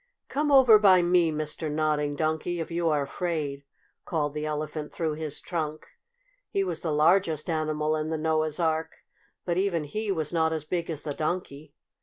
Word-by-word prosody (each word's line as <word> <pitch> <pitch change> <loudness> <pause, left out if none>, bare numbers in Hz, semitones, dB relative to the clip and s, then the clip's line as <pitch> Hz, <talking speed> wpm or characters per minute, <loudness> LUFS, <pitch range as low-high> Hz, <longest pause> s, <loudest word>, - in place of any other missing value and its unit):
"Come 295 +2 0
over 255 -6 +8
by 190 -4 +6
me, 175 -2 +3
Mr. 155 0 -3
Nodding 150 -1 0
Donkey, 160 +3 -1
if 165 - -4
you 170 0 0
are 150 -2 +1
afraid!" 145 -3 -3 0.4
called 150 -4 -1
the 150 0 -3
Elephant 150 0 -4
through 160 -2 -2
his 150 -1 -5
trunk. 155 -3 -4 0.6
He 195 - 0
was 175 -4 -3
the 165 - -2
largest 160 0 +3
animal 155 -1 0
in 155 0 -2
the 160 - -1
Noah's 155 0 0
Ark, 160 -1 -1 0.4
but 175 0 0
even 185 -5 0
he 210 +8 -3
was 160 -3 -2
not 160 -1 +2
as 155 -2 -4
big 170 +1 -2
as 155 -3 -4
the 145 - -3
Donkey. 155 -2 -4
160 Hz, 180 wpm, -27 LUFS, 150-175 Hz, 0.6 s, over